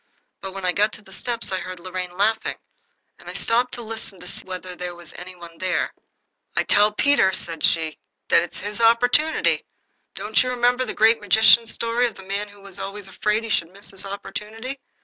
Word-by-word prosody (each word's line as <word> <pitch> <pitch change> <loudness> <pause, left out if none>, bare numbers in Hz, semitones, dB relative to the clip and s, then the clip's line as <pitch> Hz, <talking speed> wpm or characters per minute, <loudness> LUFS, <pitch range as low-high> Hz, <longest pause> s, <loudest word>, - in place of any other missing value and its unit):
But 190 -1 -6
when 195 -1 -4
I 180 - +3
got 210 +4 +2
to 215 - -9
the 190 - -15
steps 235 +1 -3
I 190 - 0
heard 185 -1 -7
Lorraine 180 0 -5
laughing, 215 +3 +1 0.6
and - - -11
I - - -6
stopped 240 +2 +1
to 240 - -7
listen 220 -3 -7
to 180 - -10
see - - -5
whether 185 0 -7
any 175 +1 -8
one 170 -1 -11
was 165 - -21
there. 185 0 0 0.6
"I - - +3
tell 205 +1 +4
Peter," 245 -3 +4
said 165 -4 -4
she, 160 -2 +2 0.3
"that - - +6
it's 175 - -5
his 210 +3 -3
opportunity. 245 +7 +4 0.5
Don't - - +2
you 255 - 0
remember 250 +1 +2
the - - -4
Great 225 +1 +5
Magician's 220 +3 +6
story 235 +1 +1
of 230 - -7
the 190 - -11
man 200 +2 -3
who 205 0 -16
was 195 -1 -11
always 195 0 -6
afraid 210 +3 0
he 225 - -6
should 165 -2 +1
miss 200 +2 -7
his 195 -1 -3
opportunity? 220 +6 -6
205 Hz, 205 wpm, -23 LUFS, 185-230 Hz, 0.6 s, that